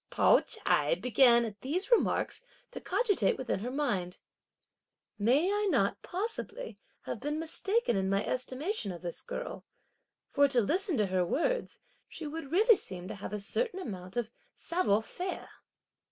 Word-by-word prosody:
Pao - - +5
ch'ai 150 +2 +1
began, 240 +1 +5
at 215 -2 -8
these 360 - -2
remarks, 475 - +2 0.3
to - - -7
cogitate 405 - +1
within 255 -6 -2
her 235 +5 -4
mind: 235 -11 -1 1.0
"May 275 - +3
I 415 0 +1
not, 230 - +1
possibly, 455 +5 -5 0.2
have - - -5
been 295 +1 -2
mistaken 360 - 0
in 190 -1 0
my 195 +1 +1
estimation 255 - -2
of 175 0 -9
this 170 -1 -5
girl; 485 - -6 0.7
for 285 0 +5
to 265 -3 +3
listen 350 - +1
to 210 - +3
her 185 -1 +1
words, 485 - -1 0.3
she 325 - -7
would 300 -1 -6
really 430 +5 +6
seem 180 -1 -8
to - - -5
have 200 - -6
a 210 - -3
certain 385 - -2
amount 185 - -7
of 235 -2 -1 0.2
savoir 280 - +1
faire!" 360 +9 -5
270 Hz, 155 wpm, -31 LUFS, -, 1.0 s, really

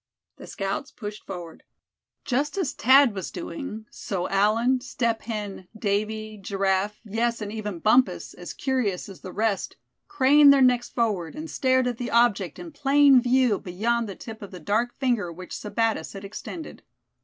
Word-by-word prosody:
The - - -11
scouts 195 +8 -3
pushed 210 -1 -8
forward. 175 -4 -8 0.6
Just 285 +6 -1
as 360 -9 -1
Thad 265 -1 +5
was 190 -3 -5
doing, 275 -10 -6
so 185 -3 -3
Allan, 225 +6 +3
Step 235 -3 -1
Hen, 205 -4 -5
Davy, 215 +1 -2
Giraffe, 195 +1 0
yes, 230 +3 -1
and 210 -2 -5
even 210 -4 -4
Bumpus, 245 +8 +2
as - - -8
curious 250 -9 -1
as 195 -2 -12
the 185 - -8
rest, 215 -1 -1 0.3
craned 290 -5 +6
their 280 - +5
necks 245 -1 +3
forward, 210 -6 -1
and 310 +1 -7
stared 260 -1 +2
at 245 -2 -2
the 245 - -3
object 220 -8 +2
in 340 - -8
plain 285 -2 +5
view 250 -3 +3
beyond 225 +5 -1
the 195 - -6
tip 225 -1 -9
of 200 - -8
the 185 - -9
dark 220 +9 -1
finger 240 -10 0
which 180 +2 -9
Sebattis 225 +1 -1
had 195 0 -8
extended. 310 - -8
225 Hz, 165 wpm, -25 LUFS, 200-255 Hz, 0.6 s, craned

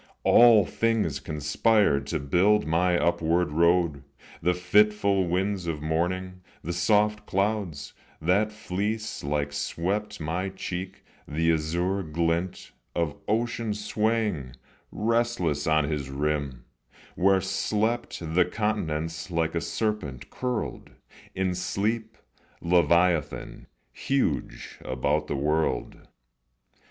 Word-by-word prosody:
All 115 -4 +7
things 115 -1 0
conspired 75 - +1
to - - -1
build 95 +9 +3
my 90 +3 +2
upward 85 -1 +1
road: 85 -2 +2 0.4
The 90 +2 +2
fitful 100 +1 +3
winds 95 +1 -1
of 75 -2 -3
morning, 90 +4 -2 0.2
the 85 - -3
soft 105 +4 +2
clouds, 95 -7 -1 0.3
That 100 +7 +2
fleece 105 +1 -3
like 70 0 -1
swept 105 +8 -2
my 85 +5 -2
cheek, 95 0 -6 0.2
the 80 +2 +1
azure 85 +5 -1
glint 85 +2 -2 0.2
Of 85 -4 -1
ocean 115 0 -1
swaying, 105 - -1 0.4
restless, 110 -10 0
on 80 -1 +3
his 70 -2 -3
rim, 70 -3 -2 0.5
Where 95 +1 +3
slept 105 +5 -1
the 85 +2 +2
continents 80 -6 -2
like 80 -2 0
a - - -1
serpent 105 - -3
curled 125 -3 -3 0.5
In 95 -1 0
sleep, 110 +5 -2 0.4
leviathan, 85 -2 +1 0.3
huge, 135 -1 -2
about 75 +4 -1
the - - -2
world. 75 +3 -1
90 Hz, 105 wpm, -26 LUFS, 80-105 Hz, 0.5 s, All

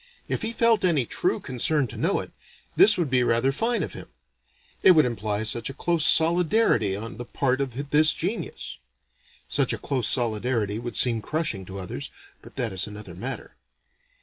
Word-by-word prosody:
If - - -2
he 225 - -2
felt 230 -1 +3
any 160 -9 +2
true - - 0
concern 135 +3 0
to - - -5
know - - 0
it, - - -10 0.4
this 210 0 +6
would 165 -7 -1
be 130 -1 +3
rather 120 +2 +2
fine 230 - 0
of - - -6
him: - - -9 0.7
it 185 - +7
would 155 -4 +5
imply 110 -3 -2
such 110 +2 -1
a 135 - -8
close 170 +1 0
solidarity 165 - +3
on 115 +4 -7
the 120 - -5
part 130 +1 -1
of 140 +2 -5
this 155 +1 +6
genus. 190 +8 -4 0.7
(Such - - +1
a - - -3
close 135 -5 -2
solidarity 110 -2 0
would 120 -1 -6
seem 115 -3 +2
crushing, 150 - -2
to 95 +1 -9
others; 90 -7 -6 0.3
but - - -15
that 120 -6 -2
is 95 +2 -1
another 105 -3 -9
matter.) 120 +10 -7
125 Hz, 180 wpm, -25 LUFS, 110-155 Hz, 0.7 s, it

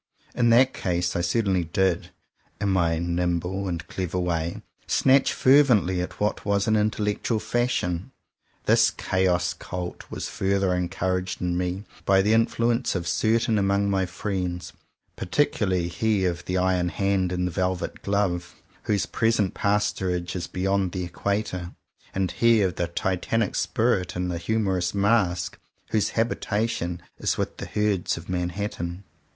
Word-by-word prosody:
In 120 -1 +2
that 130 +3 +5
case, 90 -1 -1
I 85 - +1
certainly 95 0 +1
did, 90 +1 0 0.5
in 100 - 0
my 85 -4 +2
nimble 90 +3 -1
and 85 -2 -3
clever 90 -1 -3
way, 90 +3 -2 0.2
snatch 135 0 +4
fer 135 +3 +6
vently 95 -9 +2
at 90 - -6
what 105 0 0
was 100 0 +1
an 110 - +3
intellectual 105 +1 0
fashion. 105 -6 -1 0.6
This - - +5
Chaos 90 -1 0
cult 90 -1 -6
was - - -4
further 100 -2 0
encouraged 90 +1 -1
in 90 -1 -1
me 90 +2 -2 0.2
by 95 0 +4
the 105 +2 +3
influence 115 +1 +1
of 85 -2 -2
certain 110 +3 +2
among 100 0 +2
my 95 -1 +1
friends; 90 -2 -3 0.4
particularly 95 -5 +1
he 95 +3 0
of 85 -1 -2
the 90 - -1
iron 90 -1 +2
hand 95 +1 0
in 90 0 -1
the 90 - -1
velvet 90 +1 -2
glove, 95 -3 -1 0.3
whose 105 -2 +1
present 115 -4 +1
pastorage 95 -4 0
is 90 -1 -3
beyond 95 0 0
the 95 - -2
Equator, 90 0 -3 0.4
and 95 -1 0
he 115 -3 +4
of 95 -2 +1
the 85 +1 -2
titanic 95 +5 -1
spirit 115 -7 0
in 90 0 -1
the 85 -1 -2
humorous 95 -2 0
mask, 100 -4 +1 0.3
whose 110 -2 +2
habitation 105 -6 -1 0.2
is - - 0
with - - -3
the - - -6
herds 105 -5 0
of 85 - -9
Manhattan. 90 0 -3
95 Hz, 145 wpm, -25 LUFS, 90-105 Hz, 0.6 s, fer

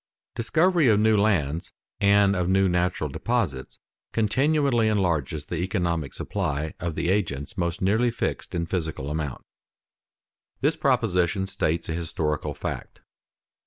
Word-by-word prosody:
_Discovery 160 +3 +3
of 105 - +4
new 110 0 +4
lands 90 -7 +1 0.3
and 100 0 +4
of 90 -1 0
new 95 0 +4
natural 90 -3 0
deposits 75 - -2 0.4
continually 125 +2 +2
enlarges 80 - 0
the 85 - -4
economic 85 - -1
supply 75 +2 -2
of 85 -3 -3
the 85 - -1
agents 80 -8 -1
most 85 -1 -2
nearly 110 +6 +3
fixed 115 - -3
in 85 -1 0
physical 80 -5 -3
amount._ 75 -4 -4 1.2
This 150 +3 +2
proposition 100 - +1
states 85 -4 -1
a 80 - -2
historical 80 -2 -2
fact. - - -6
90 Hz, 125 wpm, -25 LUFS, 80-110 Hz, 1.2 s, of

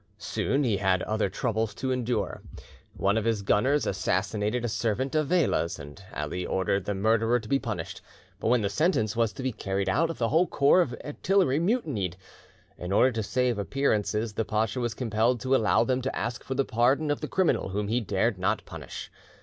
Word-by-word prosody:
Soon 125 +7 -1
he 110 -6 +1
had 95 -2 +1
other 110 -2 0
troubles 110 0 -1
to 130 0 -2
endure. 125 -1 -1 0.6
One 100 +3 +2
of 110 - -4
his 110 -3 0
gunners 130 +9 +2
assassinated 105 +5 -1
a - - +1
servant 115 +4 -1
of 155 -2 +1
Vela's, 160 - +1
and 75 +6 -11
Ali 75 +5 -3
ordered 95 +1 0
the 105 - -2
murderer 115 +4 +2
to 110 - -11
be 135 +4 +2
punished, - - -5 0.4
but - - -2
when 120 -1 +3
the - - +2
sentence 110 - +1
was 115 -2 +2
to 130 - -7
be 130 - 0
carried 100 -2 -2
out 160 +11 +1
the 115 -1 0
whole 165 +6 +3
corps 145 +6 +4
of 125 -8 -1
artillery 165 -1 +1
mutinied. 150 - -1 0.6
In 90 +1 -5
order 125 +6 +4
to 115 -2 -2
save 125 +1 0
appearances, 110 -2 0
the 110 - -1
pacha 110 +2 -1
was 120 -3 -2
compelled 115 +1 +1
to 130 +1 +2
allow 115 -2 +3
them 130 +2 0
to 135 +1 -3
ask 120 +2 -3
for 130 - -4
the 135 0 +1
pardon 130 +7 +2
of 145 - -2
the - - -3
criminal 185 - +1
whom 100 +2 -2
he 120 +4 +1
dared 105 0 0
not 105 +4 0
punish. - - -8
115 Hz, 200 wpm, -27 LUFS, 105-130 Hz, 0.6 s, corps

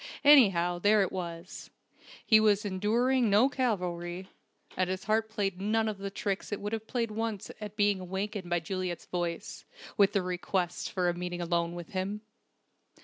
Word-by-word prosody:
Anyhow, 195 -12 +6
there 205 +2 +4
it 190 - -3
was! 170 -1 -6 0.6
He 220 -2 +6
was 210 -1 +3
enduring 230 +6 +1
no 215 +7 +5
Calvary, 180 -8 -2 0.5
and 185 0 0
his 185 0 -3
heart 220 +1 +1
played 195 -4 -2
none 220 +2 +1
of 210 -2 -3
the 195 0 -4
tricks 195 0 -3
it 205 - -2
would 205 +2 -4
have 220 0 -4
played 230 -3 -1
once 220 -2 -3
at 210 -1 -7
being 205 -2 +3
awakened 190 +1 -4
by 175 -1 +1
Juliet's 180 0 -4
voice, 175 -2 -4 0.3
with 200 -1 +4
the 200 - +1
request 180 0 -2
for 180 -2 0
a 175 - +2
meeting 175 0 -4
alone 170 0 -1
with 175 -2 -8
him. 195 +2 -3
195 Hz, 170 wpm, -30 LUFS, 180-215 Hz, 0.6 s, Anyhow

